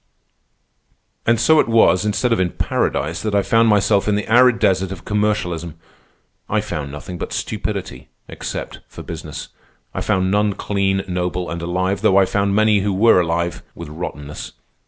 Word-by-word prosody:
"And 120 -1 +3
so 160 +5 +5
it - - +3
was, 110 -4 +4
instead 110 +3 +1
of 115 - 0
in 90 -1 +1
paradise, 75 +5 -1
that 105 -2 -2
I 100 - +3
found 115 +2 +3
myself 105 -1 +3
in 105 - +2
the 105 - -2
arid 125 +1 +5
desert 95 -4 +1
of 95 -3 -8
commercialism. 90 -6 -1 0.7
I - - +1
found 70 -2 -4
nothing 85 +5 -8
but - - -5
stupidity, 65 +1 -4 0.2
except - - -6
for - - -10
business. 80 -3 -7 0.4
I - - -3
found 95 -3 +1
none 105 0 +2
clean, 95 -1 -1
noble, 90 -1 -2
and 85 0 -4
alive, 95 +3 -1
though 95 - +4
I 95 - +6
found 100 +1 0
many 110 -1 +4
who 100 0 -1
were 105 -2 +5
alive—with 85 -1 -4
rottenness. 75 -2 -7
95 Hz, 165 wpm, -20 LUFS, 85-105 Hz, 0.7 s, I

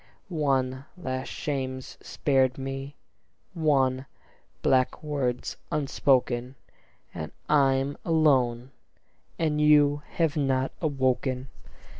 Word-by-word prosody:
One 135 -5 0
last 130 -6 -4
shame's 130 -3 -4
spared 130 -3 +1
me, 135 +1 -5 0.6
one 135 -4 +1 0.6
black 130 +2 +2
word's 135 -5 -2
unspoken; 130 -3 +1 0.6
And 80 - -6 0.2
I'm 135 -1 +3
alone; 130 -7 +2 0.7
and 150 -2 0
you 145 -1 +5
have 165 -3 +1
not 135 -3 +1
awoken. 130 -3 0
135 Hz, 85 wpm, -27 LUFS, 130-145 Hz, 0.7 s, you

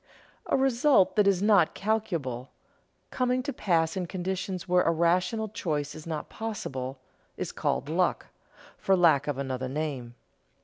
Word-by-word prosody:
A - - +2
result 265 -4 +3
that 210 -2 +4
is 195 -1 +3
not 200 -6 +4
calculable, 170 - -2 0.6
coming 255 0 0
to 285 - -3
pass 165 -7 +1
in 180 -2 -2
conditions 185 0 -4
where 180 0 +4
a - - +2
rational 180 +7 +1
choice 150 -8 -3
is 155 +1 -10
not 155 -2 -4
possible, 135 - -5 0.4
is - - -3
called - - -1
luck, - - 0 0.5
for 195 - +3
lack 155 -5 +4
of 145 -3 -1
another 130 -1 -3
name. 135 -5 -4
175 Hz, 145 wpm, -28 LUFS, 150-210 Hz, 0.6 s, that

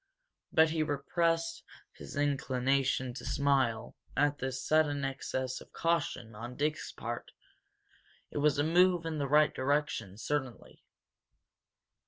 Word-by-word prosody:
But 160 0 +5
he 160 -1 0
repressed 165 +3 0 0.3
his - - -10
inclination 135 -2 +1
to 125 - -8
smile 135 -4 +1 0.2
at 145 +1 +2
this 130 0 -3
sudden 145 -3 +2
excess 130 -1 -3
of - - -15
caution 165 -9 -1
on 120 +4 -7
Dick's 150 +2 -1
part. - - -6 1.0
It - - -3
was 150 0 +3
a 145 - +2
move 175 +1 +4
in 160 -2 -2
the 140 - 0
right 150 +1 +5
direction, 130 -7 -1
certainly. 130 +1 -4
145 Hz, 125 wpm, -31 LUFS, 130-155 Hz, 1.0 s, But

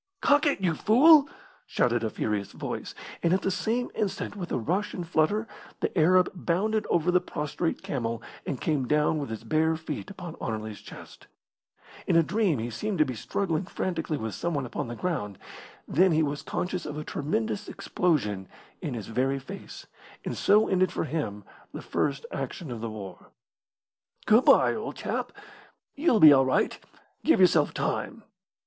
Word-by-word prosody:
"Cock 290 +2 +4
it, 285 - +1
you 175 -3 +2
fool!" 280 - +6 0.4
shouted 120 -1 +1
a 110 - 0
furious 105 -1 -3
voice; - - -5 0.3
and 170 0 +2
at 190 - -2
the 195 - +1
same 230 +6 -1
instant, 200 -1 -3
with 180 -4 -6
a - - +1
rush 190 - -1
and 175 -3 -5
flutter, 195 +7 +1 0.3
the - - -2
Arab 180 +2 +5
bounded 195 +5 0
over 175 +1 +2
the 180 0 +3
prostrate 150 +3 -3
camel 115 -4 -2 0.2
and 135 - -4
came 145 -5 0
down 150 +2 +2
with 140 - -4
his 110 -1 -6
bare 155 +7 +2
feet 160 +4 -6
upon 175 -4 -8
Anerley's 110 -1 -4
chest. - - -13 0.8
In - - +2
a 165 - +6
dream 200 -4 +1
he 115 +1 -4
seemed 205 - -3
to 155 - +4
be 130 - -4
struggling 160 - -2
frantically 165 -5 -2
with 110 -4 -4
someone 150 -6 -2
upon 120 - -4
the 120 - -6
ground, 115 - -3 0.5
then 185 +3 +4
he 155 0 +3
was 145 -1 -2
conscious 180 -1 -3
of 150 0 -5
a 155 - -4
tremendous 205 +8 -2
explosion 105 - -1 0.3
in 150 -9 -3
his 110 -4 -5
very 130 +4 0
face, 185 +9 -9 0.4
and - - -3
so 210 +1 +4
ended 185 -1 +2
for - - -2
him 145 -11 -3 0.3
the - - -6
first 140 -1 -1
action 135 +2 -5
of 115 -2 -5
the 115 - -3
war. 100 -4 -9 1.0
"Good 220 +4 +5
bye, - - +6
old - - -5
chap. - - -3 0.6
You'll 280 -6 +2
be 155 -5 +10
all 135 -1 +5
right. 130 - +1 0.4
Give 320 - +4
yourself 185 -1 +4
time." 230 -5 -3
160 Hz, 175 wpm, -27 LUFS, 130-190 Hz, 1.0 s, be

